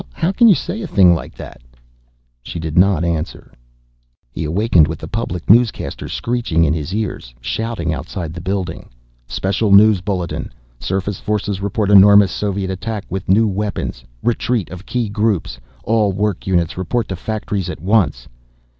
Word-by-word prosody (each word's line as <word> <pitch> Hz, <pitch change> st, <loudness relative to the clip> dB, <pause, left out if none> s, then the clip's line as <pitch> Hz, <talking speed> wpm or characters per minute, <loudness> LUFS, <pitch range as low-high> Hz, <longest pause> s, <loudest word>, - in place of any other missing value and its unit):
How 170 Hz, +2 st, 0 dB
can 235 Hz, +4 st, +5 dB
you 205 Hz, -, +7 dB
say 215 Hz, +7 st, -4 dB
a 195 Hz, -, -4 dB
thing 95 Hz, -, +5 dB
like 80 Hz, -, -5 dB
that?" -, -, -10 dB, 0.8 s
She 75 Hz, -, -7 dB
did 80 Hz, -1 st, -4 dB
not 90 Hz, -2 st, +4 dB
answer. 85 Hz, -1 st, -3 dB, 0.8 s
He 80 Hz, +6 st, -4 dB
awakened 85 Hz, -1 st, +3 dB
with 80 Hz, 0 st, -4 dB
the 80 Hz, -, -8 dB
public 90 Hz, -4 st, -4 dB
newscaster 115 Hz, 0 st, +2 dB
screeching 115 Hz, -9 st, 0 dB
in 75 Hz, -, +1 dB
his 80 Hz, 0 st, -4 dB
ears, 95 Hz, -, -4 dB
shouting 85 Hz, -, -3 dB
outside 80 Hz, +1 st, -5 dB
the 85 Hz, -, -7 dB
building. 95 Hz, 0 st, -4 dB, 0.4 s
"Special 100 Hz, +2 st, -1 dB
news 100 Hz, -1 st, +6 dB
bulletin! 90 Hz, -3 st, -3 dB, 0.3 s
Surface 95 Hz, +1 st, -3 dB
forces 105 Hz, -2 st, -2 dB
report 100 Hz, +1 st, -1 dB
enormous 100 Hz, -1 st, +7 dB
Soviet 100 Hz, -1 st, -2 dB
attack 100 Hz, +2 st, -4 dB
with 95 Hz, -1 st, -4 dB
new 110 Hz, +4 st, +4 dB
weapons! 100 Hz, -, -3 dB, 0.2 s
Retreat 115 Hz, -6 st, 0 dB
of 90 Hz, +2 st, -10 dB
key 120 Hz, -3 st, -1 dB
groups! 100 Hz, -, -1 dB, 0.2 s
All 110 Hz, -3 st, +2 dB
work 100 Hz, -1 st, -2 dB
units 90 Hz, -2 st, 0 dB
report 110 Hz, +5 st, -1 dB
to 95 Hz, -, -3 dB
factories 100 Hz, -1 st, -3 dB
at -, -, -6 dB
once!" 90 Hz, -, +1 dB
95 Hz, 160 wpm, -18 LUFS, 85-110 Hz, 0.8 s, you